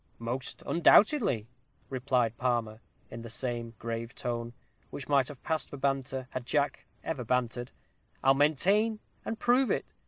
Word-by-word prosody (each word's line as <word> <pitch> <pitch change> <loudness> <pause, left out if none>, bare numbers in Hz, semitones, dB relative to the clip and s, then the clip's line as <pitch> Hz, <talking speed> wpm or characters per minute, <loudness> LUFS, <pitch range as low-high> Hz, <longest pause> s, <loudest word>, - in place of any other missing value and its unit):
"Most 120 +3 -4
undoubtedly," 175 - +4 0.4
replied 125 -3 +1
Palmer, 115 -3 -1 0.3
in 115 - -7
the 115 - -8
same 120 -1 -2
grave 115 +1 -5
tone, 120 -1 -3 0.4
which 140 - -7
might 140 -3 +3
have 145 -4 -9
passed 160 -3 -1
for 145 - -7
banter, 135 -1 -1
had 130 - -4
Jack 145 +3 0 0.2
ever 140 -6 -3
bantered. 120 0 -1 0.5
"I'll 135 - +6
maintain 195 +10 +3 0.2
and 225 - -3
prove 250 +3 +3
it. - - -2
130 Hz, 145 wpm, -30 LUFS, 120-145 Hz, 0.5 s, I'll